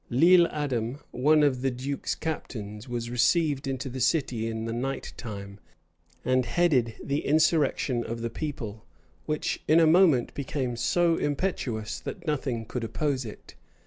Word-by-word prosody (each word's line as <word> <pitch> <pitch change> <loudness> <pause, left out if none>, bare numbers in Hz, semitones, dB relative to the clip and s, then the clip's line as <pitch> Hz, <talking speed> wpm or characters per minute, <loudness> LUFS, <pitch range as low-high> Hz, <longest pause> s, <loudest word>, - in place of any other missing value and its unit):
Lile 170 +7 +6
Adam, 130 -5 -2
one 150 +4 +4
of 130 -4 +2
the 135 - +2
duke's 130 +3 -3
captains, 110 -7 -5
was 120 -1 -3
received 140 +3 +2
into 135 0 -3
the 130 0 -5
city 125 -6 +1
in 110 0 -3
the 115 - -3
night 135 +3 -3
time, 100 -3 -8 0.7
and 130 0 +3
headed 130 -7 +2
the 140 +2 -1
insurrection 150 -5 +2
of 115 0 -5
the 115 0 -3
people, 115 -9 -5 0.4
which 150 0 -1
in 160 +2 +6
a 165 - +6
moment 160 -6 +4
became 130 -3 -3
so 165 +7 +2
impetuous 135 - -2
that - - -7
nothing 130 -7 -2
could 125 +2 -4
oppose 130 +3 -1
it. 105 - -10
130 Hz, 150 wpm, -27 LUFS, 115-150 Hz, 0.7 s, Lile